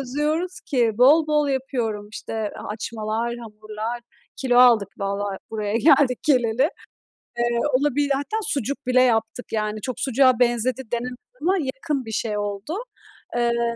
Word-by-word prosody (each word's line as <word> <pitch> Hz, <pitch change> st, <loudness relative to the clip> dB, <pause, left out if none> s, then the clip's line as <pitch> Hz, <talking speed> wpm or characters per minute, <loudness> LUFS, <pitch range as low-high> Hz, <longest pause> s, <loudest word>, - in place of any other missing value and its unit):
özlüyoruz 300 Hz, +7 st, -2 dB
ki 240 Hz, -5 st, +1 dB
bol 295 Hz, +5 st, +6 dB
bol 300 Hz, -1 st, +2 dB
yapıyorum, 240 Hz, -6 st, -2 dB
işte, -, -, -7 dB
a 215 Hz, -2 st, -4 dB
açmalar, 220 Hz, +2 st, -3 dB
hamurlar. 215 Hz, +1 st, -6 dB, 0.4 s
Kilo 245 Hz, -2 st, +2 dB
aldık 235 Hz, -6 st, +6 dB
vallahi 200 Hz, 0 st, -2 dB
buraya 215 Hz, -1 st, -2 dB
geldik 255 Hz, -1 st, +4 dB
geleli. 255 Hz, 0 st, +3 dB, 0.7 s
Eee, 240 Hz, 0 st, +1 dB
olabili 285 Hz, +1 st, +2 dB
hatta 285 Hz, +11 st, -2 dB
sucuk 280 Hz, -, -2 dB
bile 255 Hz, 0 st, +4 dB
yaptık, 225 Hz, -1 st, +1 dB
yani, 215 Hz, 0 st, -2 dB
çok 255 Hz, 0 st, -4 dB
sucuğa 260 Hz, -1 st, +3 dB
benzedi 245 Hz, +1 st, +1 dB
denemez 245 Hz, +1 st, -2 dB, 0.3 s
ama 375 Hz, +4 st, +2 dB
yakın 270 Hz, -2 st, -3 dB
bir 220 Hz, -, -7 dB
şey 215 Hz, -1 st, -1 dB
oldu. 205 Hz, -, -4 dB, 0.6 s
Iıı, 235 Hz, 0 st, +1 dB
240 Hz, 140 wpm, -23 LUFS, 220-270 Hz, 0.7 s, bol